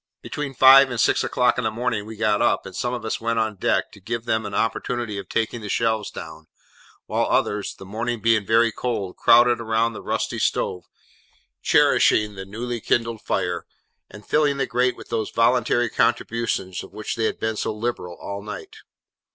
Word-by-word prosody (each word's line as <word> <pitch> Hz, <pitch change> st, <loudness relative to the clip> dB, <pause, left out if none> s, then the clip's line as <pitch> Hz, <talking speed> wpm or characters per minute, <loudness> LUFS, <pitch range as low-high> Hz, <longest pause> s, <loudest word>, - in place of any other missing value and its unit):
Between 145 Hz, -2 st, -5 dB
five 135 Hz, +1 st, +8 dB
and 120 Hz, -2 st, -4 dB
six -, -, +3 dB
o'clock 125 Hz, 0 st, +1 dB
in -, -, -2 dB
the 110 Hz, -, +1 dB
morning 115 Hz, -2 st, -2 dB
we 110 Hz, -, -8 dB
got 105 Hz, -1 st, +1 dB
up, -, -, +2 dB
and 95 Hz, -, -9 dB
some 120 Hz, -, -2 dB
of 120 Hz, -3 st, -5 dB
us 110 Hz, -, -3 dB
went 115 Hz, 0 st, -1 dB
on 110 Hz, -1 st, 0 dB
deck, -, -, 0 dB
to -, -, -15 dB
give 115 Hz, +4 st, -4 dB
them 110 Hz, -2 st, 0 dB
an 100 Hz, -, -6 dB
opportunity 115 Hz, -2 st, -2 dB
of 95 Hz, -, -9 dB
taking 115 Hz, +1 st, -1 dB
the 105 Hz, -, -7 dB
shelves 110 Hz, 0 st, 0 dB
down; 80 Hz, -1 st, -10 dB, 0.6 s
while -, -, 0 dB
others, 105 Hz, -1 st, 0 dB
the 95 Hz, -, -12 dB
morning 115 Hz, +4 st, -3 dB
being 115 Hz, -1 st, +2 dB
very 115 Hz, +3 st, +3 dB
cold, 105 Hz, -5 st, -3 dB
crowded 120 Hz, +1 st, +5 dB
round 115 Hz, 0 st, 0 dB
the -, -, -8 dB
rusty -, -, -2 dB
stove, 90 Hz, -2 st, -1 dB, 0.8 s
cherishing 105 Hz, -1 st, +3 dB
the 95 Hz, -1 st, -8 dB
newly 115 Hz, +4 st, -5 dB
kindled 115 Hz, -1 st, 0 dB
fire, -, -, -2 dB, 0.4 s
and 105 Hz, +1 st, -13 dB
filling 145 Hz, -2 st, +2 dB
the 135 Hz, -, 0 dB
grate 125 Hz, +1 st, 0 dB
with -, -, -12 dB
those 110 Hz, -2 st, -2 dB
voluntary 120 Hz, +1 st, +2 dB
contributions 110 Hz, -5 st, -1 dB
of -, -, -12 dB
which 110 Hz, +3 st, -4 dB
they 115 Hz, -2 st, 0 dB
had -, -, -2 dB
been 110 Hz, 0 st, -1 dB
so 105 Hz, -, -2 dB
liberal 105 Hz, -5 st, -4 dB
all 100 Hz, 0 st, -6 dB
night. 105 Hz, 0 st, -8 dB
115 Hz, 190 wpm, -23 LUFS, 105-120 Hz, 0.8 s, five